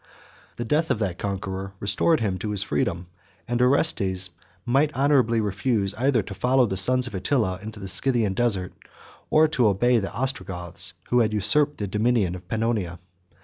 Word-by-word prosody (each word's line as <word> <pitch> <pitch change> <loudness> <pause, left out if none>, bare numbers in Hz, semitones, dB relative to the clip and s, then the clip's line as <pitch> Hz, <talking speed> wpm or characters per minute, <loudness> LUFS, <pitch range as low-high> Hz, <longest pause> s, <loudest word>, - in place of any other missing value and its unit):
The 120 - -5
death 155 +7 0
of - - +1
that 95 -5 -3
conqueror 95 -1 -4
restored 115 +9 +2
him 95 -4 -1
to 105 - -4
his 100 -2 0
freedom; 85 +3 -2 0.4
and 120 0 -1
Orestes 100 - +2 0.3
might 135 +5 +2
honorably 130 -5 +2
refuse 100 0 -1
either 120 0 +1
to 100 - -8
follow 125 +6 +2
the 95 - -3
sons 125 +7 +2
of 120 - -7
Attila 95 -1 0
into 110 0 -8
the 95 - -7
Scythian 110 +1 +1
desert, 95 -5 0 0.6
or 155 +1 +5
to 125 -7 +2
obey 120 +5 +3
the 100 - -4
Ostrogoths, 95 -8 -3 0.2
who 125 - +3
had 110 -2 +1
usurped 145 +8 +3
the 105 - -3
dominion 105 -1 +1
of 90 -1 -10
Pannonia. 110 -5 -2
110 Hz, 170 wpm, -24 LUFS, 95-125 Hz, 0.6 s, or